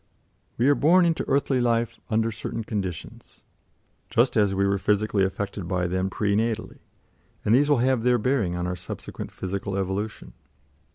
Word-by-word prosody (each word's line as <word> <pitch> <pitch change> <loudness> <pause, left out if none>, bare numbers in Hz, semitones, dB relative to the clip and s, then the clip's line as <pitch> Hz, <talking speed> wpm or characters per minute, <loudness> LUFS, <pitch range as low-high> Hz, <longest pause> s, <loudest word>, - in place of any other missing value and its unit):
We 120 - +2
are 145 - +6
born 175 +6 +4
into 165 -1 +1
earthly 135 -1 +1
life 115 -1 0
under 110 0 +1
certain 115 +1 -5
conditions, 95 -6 -6 0.7
just 120 +3 +2
as 100 -3 +3
we 100 +1 +2
were 100 0 +1
physically 105 0 +1
affected 95 -1 -3
by 90 0 0
them 95 +2 -1
pre 100 0 0
natally, 110 0 -2 0.7
and 105 - +3
these 145 +4 +4
will 145 - +4
have 130 -3 +2
their 125 +1 +3
bearing 110 -6 0
on 90 0 -2
our 90 0 -2
subsequent 90 - -7
physical 95 +1 -4
evolution. 100 +3 -3
105 Hz, 165 wpm, -25 LUFS, 95-120 Hz, 0.7 s, are